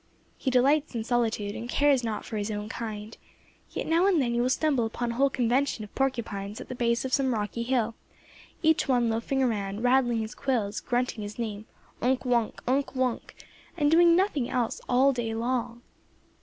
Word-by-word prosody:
He - - -2
delights 275 +3 +2
in 225 - -1
solitude, 225 -4 0
and 235 +1 -6
cares 280 -1 +3
not 225 -2 -3
for 220 - -5
his 205 +1 -2
own 210 0 -4
kind; 220 -2 -6 0.5
yet - - -4
now 335 +4 +3
and 370 -5 +3
then 240 -4 +1
you 240 - +1
will 250 - +1
stumble 275 -2 +2
upon 235 +1 -3
a - - -4
whole 275 +4 +3
convention 250 -1 0
of 210 - -11
porcupines 220 -6 -2
at - - -9
the - - -4
base 235 0 0
of 260 - -4
some 265 -3 +2
rocky 210 +2 -3
hill, 235 -2 0 0.7
each 320 -1 +3
one 245 -3 +2
loafing 250 +4 0
around, 205 -3 -1
rattling 245 -2 +3
his 220 +2 -5
quills, 235 -8 -1
grunting 245 -2 -1
his 205 0 -7
name 215 -2 -4 0.3
Unk 255 +2 +1
Wunk! 240 -3 0
Unk 270 +2 0
Wunk! 255 -2 -2 0.4
and 295 -2 +2
doing 335 +1 +6
nothing 345 - +1
else 245 -3 -1
all 265 +3 +4
day 230 -3 -3
long. 240 0 -2
240 Hz, 190 wpm, -27 LUFS, 225-265 Hz, 0.7 s, doing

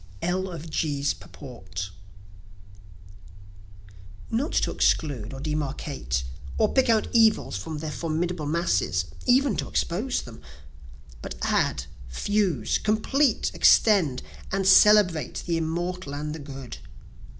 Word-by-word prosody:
L. 185 +2 0
of 165 -2 -7
G.'s 145 -3 -1
Purport 95 - -9 2.4
Not 260 +9 0
to - - +1
exclude 125 -8 0
or 135 - -7
demarcate, 140 - -3 0.3
or - - +2
pick 265 -2 +3
out 220 -1 +3
evils 225 - +3
from 110 +12 -5
their 155 0 -4
formidable 165 0 -2
masses 95 - 0 0.2
(even 255 -2 +4
to - - -2
expose 220 +10 -1
them,) 115 -2 -11 0.8
But - - -6
add, - - +1 0.2
fuse, 175 - 0
complete, 235 +6 +1
extend 180 - +4 0.3
and 195 0 0
celebrate 190 -7 +5
the 170 -1 0
immortal 170 -1 -3
and 150 +1 -4
the 160 - -7
good. 135 -4 -8
160 Hz, 115 wpm, -25 LUFS, 140-195 Hz, 2.4 s, celebrate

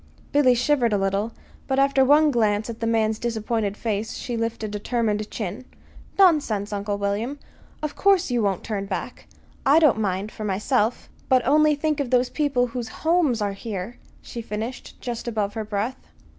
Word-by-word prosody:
Billy 270 -4 +5
shivered 245 -2 +2
a - - +3
little; 195 +3 0 0.4
but 265 - 0
after 275 0 +4
one 295 +3 +5
glance 215 -2 +1
at 225 - -10
the 230 - -1
man's 220 -1 +1
disappointed 220 -3 -2
face 220 -1 -2
she 240 - -4
lifted 230 -1 -2
a 210 0 -4
determined 215 -2 -1
chin. 215 +3 -5 0.5
"Nonsense, 285 - +3
Uncle 205 0 -2
William! 205 +7 -2 0.5
Of 305 - -3
course 380 -6 +3
you 240 -1 +1
won't 195 -3 0
turn 200 -3 -3
back. 195 +5 -5 0.4
I 280 +2 +5
don't 300 -9 +5
mind 200 0 -1
for 215 - -7
myself; 210 +4 0 0.2
but 255 -2 +4
only 300 +3 +4
think 300 0 -1
of 275 -3 -1
the 250 0 +3
people 280 -5 +1
whose 240 -1 -5 0.2
homes 315 -10 +3
are 200 -1 -1
here," 200 +1 -6 0.2
she 235 - -6
finished, 225 +3 -6
just 240 -1 -5
above 210 -3 -1
her 220 - -3
breath. 215 +5 -3
230 Hz, 175 wpm, -24 LUFS, 210-265 Hz, 0.5 s, Billy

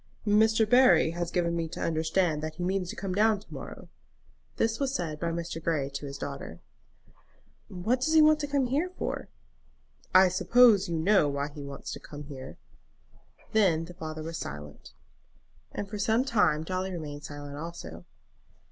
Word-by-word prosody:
"Mr. 220 +1 +4
Barry 250 -7 +5
has 175 0 -3
given 170 -1 0
me 165 -1 -1
to - - -8
understand 160 0 0
that 155 0 -5
he 175 - -5
means 185 0 -1
to - - -5
come 195 -2 -4
down 215 +1 +3
to 180 -5 -16
morrow." 135 -4 -9 0.7
This 225 0 0
was 275 -1 -1
said 155 -4 -3
by 170 - -1
Mr. 165 -1 -4
Grey 145 -5 0
to 140 +1 -5
his 140 0 -7
daughter. 140 - -7 1.1
"What 215 +8 -1
does 315 +5 +1
he 320 - +7
want 310 0 +5
to 290 - -2
come 280 -2 +1
here 290 +9 0
for?" - - -4 0.8
"I 190 0 +7
suppose 215 +1 +5
you 170 - -1
know 165 -2 +3
why 140 +1 -2
he 145 0 -10
wants 140 -1 -7
to - - -6
come 145 0 -9
here?" 140 -2 -9 0.9
Then 180 -7 +3
the 175 - -11
father 155 -2 -6
was 165 +1 -5
silent, 75 +1 -8 0.8
and 200 - -5
for 210 +1 -6
some 225 +5 +2
time 175 - +2
Dolly 185 +2 -3
remained 150 -4 -6
silent 145 -1 -8
also. 115 - -8
170 Hz, 175 wpm, -28 LUFS, 150-210 Hz, 1.1 s, he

